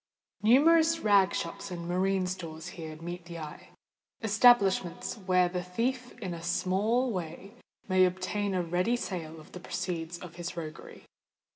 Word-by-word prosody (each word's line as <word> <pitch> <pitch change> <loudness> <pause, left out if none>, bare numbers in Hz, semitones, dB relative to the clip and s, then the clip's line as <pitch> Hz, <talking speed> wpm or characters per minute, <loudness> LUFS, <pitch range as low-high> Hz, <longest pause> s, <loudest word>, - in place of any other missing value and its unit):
Numerous 320 +8 +5
rag 200 -3 +5
shops 170 +3 -4
and 170 -2 -6
marine 185 +1 +1
stores 165 -4 -5
here 160 -2 -7
meet 175 +1 -6
the 170 -1 -8
eye,—establishments 200 - +1
where 185 -4 +2
the 180 0 -3
thief 245 +8 -2
in 190 -7 -4
a 170 - -7
small 205 +8 +1
way 180 +2 -6 0.3
may 185 -2 +4
obtain 185 +2 -1
a 180 - +1
ready 180 +7 +1
sale 165 -8 -5
for - - -19
the 180 - -8
proceeds 175 -2 -4
of 170 -1 -11
his 175 0 -5
roguery. 155 -2 -8
185 Hz, 145 wpm, -30 LUFS, 170-205 Hz, 0.3 s, Numerous